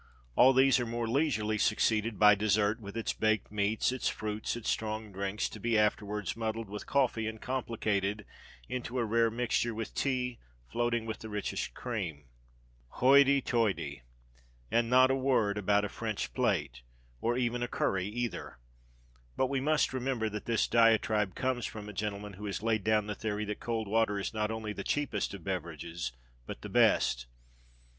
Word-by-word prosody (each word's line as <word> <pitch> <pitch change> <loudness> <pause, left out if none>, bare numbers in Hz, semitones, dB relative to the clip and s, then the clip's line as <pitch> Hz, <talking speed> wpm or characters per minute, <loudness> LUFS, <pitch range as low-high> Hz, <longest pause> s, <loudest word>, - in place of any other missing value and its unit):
All 130 - +7
these 135 0 +5
are 120 - -1
more 115 0 -2
leisurely 110 -5 +1
succeeded 110 0 +1
by 105 +1 +7
dessert, 105 +1 +2
with 100 0 -8
its 115 - -1
baked 110 -2 0
meats, 105 +3 +1
its 130 -1 -1
fruits, 105 +1 -3
and 120 - -7
its - - +1
strong 110 -1 -3
drinks, 100 +2 -2
to 110 - -9
be 115 +1 +1
afterwards 105 -1 0
muddled 110 -2 -3
with 105 - -6
coffee, 125 -5 +1
and 110 0 -5
complicated 105 -5 -1 0.4
into 125 0 -4
a 120 - +1
rare 115 +1 +3
mixture 120 0 0
with 115 0 -5
tea, 125 -3 -1 0.3
floating 120 - 0
with 110 -1 -4
the 110 - -8
richest 105 -1 -3
cream." 90 - -4 0.7
Hoity, 140 +1 +5
toity! 95 - 0 0.7
And 115 0 +2
not 130 +1 +6
a - - +2
word 125 -6 +1
about 105 +1 +2
a - - -1
French 110 0 -4
plât, 65 -4 0 0.4
or 120 +1 0
even 120 -1 0
a 120 - 0
curry, 95 -5 0
either! 120 - -4 0.8
But 130 - +2
we 135 -1 0
must 150 0 +2
remember 125 -3 -1
that 105 0 -6
this 115 -2 +1
diatribe 110 -3 +3
comes 130 -2 -1
from 105 -1 -8
a 105 - -7
gentleman 105 0 -4
who 105 +3 -7
has 100 +1 -4
laid 110 -3 +1
down 110 -1 +2
the 105 - -3
theory 105 0 -3
that 105 0 -4
cold 115 -2 -2
water 110 -1 +2
is 100 - -3
not 105 -1 -1
only 110 -1 -4
the - - -5
cheapest 130 -9 -1
of 95 - -11
beverages, 85 -3 -4 0.4
but - - -7
the - - -6
best. - - +3
110 Hz, 175 wpm, -31 LUFS, 105-120 Hz, 0.8 s, All